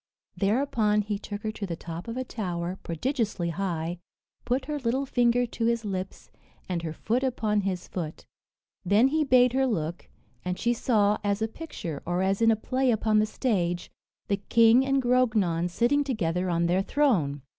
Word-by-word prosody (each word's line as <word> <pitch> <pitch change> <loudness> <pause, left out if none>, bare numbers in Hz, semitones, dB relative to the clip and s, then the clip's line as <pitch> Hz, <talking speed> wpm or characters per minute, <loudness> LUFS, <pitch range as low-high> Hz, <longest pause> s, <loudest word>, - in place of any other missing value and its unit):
Thereupon 210 -1 +1
he 205 -1 -3
took 205 -1 -7
her 215 - -1
to 210 -2 -5
the 170 - -3
top 165 +2 -8
of 230 +2 -5
a 255 - -1
tower, 180 -6 -4
prodigiously 205 - -2
high, 170 -1 -3 0.5
put 255 +2 0
her 300 +1 -3
little 260 +2 0
finger 245 -1 +2
to 230 -1 -3
his 235 -1 +1
lips, 190 -1 -5 0.4
and 175 -2 -2
her 165 -1 -4
foot 230 +10 -1
upon 220 -5 0
his 185 -2 -3
foot. 165 -4 -6 0.6
Then 205 +7 +4
he 310 +2 +1
bade 250 -3 +4
her 265 0 +2
look, 170 -7 -3 0.4
and 180 0 -2
she 240 - +1
saw 210 -4 +2
as 200 -1 +1
hi - - +3
a - - -6
picture, 180 - -6
or 175 +1 -1
as 195 +3 0
in 225 - +5
a 225 - +5
play 255 +4 0
upon 220 -2 +2
the 215 - +2
stage, 180 -8 -1 0.4
the 200 - +1
King 230 +4 +5
and 270 0 +1
Grognon 215 -9 +2
sitting 240 +10 +2
together 185 -9 -1
on 170 0 +1
their 180 +2 +2
throne. 190 - +1
210 Hz, 185 wpm, -27 LUFS, 180-245 Hz, 0.6 s, in